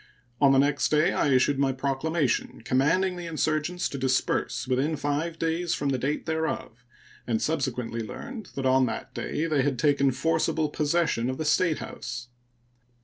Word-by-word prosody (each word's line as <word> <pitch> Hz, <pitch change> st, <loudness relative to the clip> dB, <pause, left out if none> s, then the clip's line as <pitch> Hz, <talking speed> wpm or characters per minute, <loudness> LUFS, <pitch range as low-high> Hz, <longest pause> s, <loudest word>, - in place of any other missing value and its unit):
On 140 Hz, -1 st, +6 dB
the 135 Hz, -, +4 dB
next 140 Hz, +1 st, +2 dB
day 155 Hz, +2 st, +3 dB
I -, -, +1 dB
issued 135 Hz, +1 st, +3 dB
my 135 Hz, -1 st, +3 dB
proclamation 140 Hz, 0 st, -1 dB
commanding 180 Hz, +10 st, +2 dB
the 175 Hz, -1 st, -6 dB
insurgents 160 Hz, +2 st, -1 dB
to 140 Hz, -, -5 dB
disperse 130 Hz, -1 st, 0 dB
within 135 Hz, +5 st, +1 dB
five 150 Hz, +3 st, -2 dB
days 165 Hz, +1 st, 0 dB
from 140 Hz, -, -1 dB
the 130 Hz, -2 st, 0 dB
date 140 Hz, +4 st, -2 dB
thereof, 160 Hz, -7 st, -3 dB, 0.4 s
and 115 Hz, -2 st, +1 dB
subsequently 125 Hz, -6 st, -2 dB
learned 210 Hz, -, -7 dB
that 135 Hz, -, -3 dB
on 130 Hz, 0 st, +4 dB
that -, -, -5 dB
day 155 Hz, -, -2 dB
they 155 Hz, -4 st, +2 dB
had 135 Hz, -1 st, 0 dB
taken 140 Hz, 0 st, +3 dB
forcible 160 Hz, +3 st, 0 dB
possession 150 Hz, -5 st, 0 dB
of 130 Hz, -, -3 dB
the 155 Hz, -, -3 dB
statehouse. 150 Hz, -7 st, -1 dB
145 Hz, 160 wpm, -27 LUFS, 130-160 Hz, 0.4 s, On